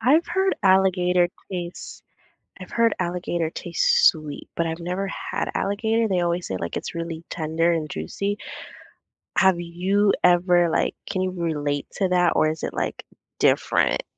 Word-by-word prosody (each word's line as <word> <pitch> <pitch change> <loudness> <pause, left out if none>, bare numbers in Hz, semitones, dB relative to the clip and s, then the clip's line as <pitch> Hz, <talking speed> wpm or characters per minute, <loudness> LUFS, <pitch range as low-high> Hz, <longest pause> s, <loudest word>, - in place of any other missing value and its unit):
I've 290 +9 +4
heard 380 +2 +1
alligator 180 -2 +3 0.2
taste 175 -2 -6 0.6
I've 185 - -10
heard 230 -1 +2
alligator 175 -2 -2
taste - - +3
sweet, 155 -4 -2
but 170 - 0
I've 160 +1 -3
never 180 +3 -3
had - - -4
alligator. 220 +3 0
They 185 -3 +1
always 175 0 -1
say, 95 - -3
like, 85 -1 -4
it's - - -6
really 165 -1 -5
tender 165 +1 0
and 160 -2 -1
juicy. 200 - -3 1.0
Have 190 -1 +5
you 190 +4 +1
ever 175 -1 +4
like, - - 0
can 190 -2 -1
you 185 0 -1
relate 150 -5 -2
to 190 -2 0
that, 180 -1 +3
or 155 - +3
is 155 +1 -5
it, - - -3
like, - - -3 0.3
different? - - +2
180 Hz, 155 wpm, -23 LUFS, 165-195 Hz, 1.0 s, Have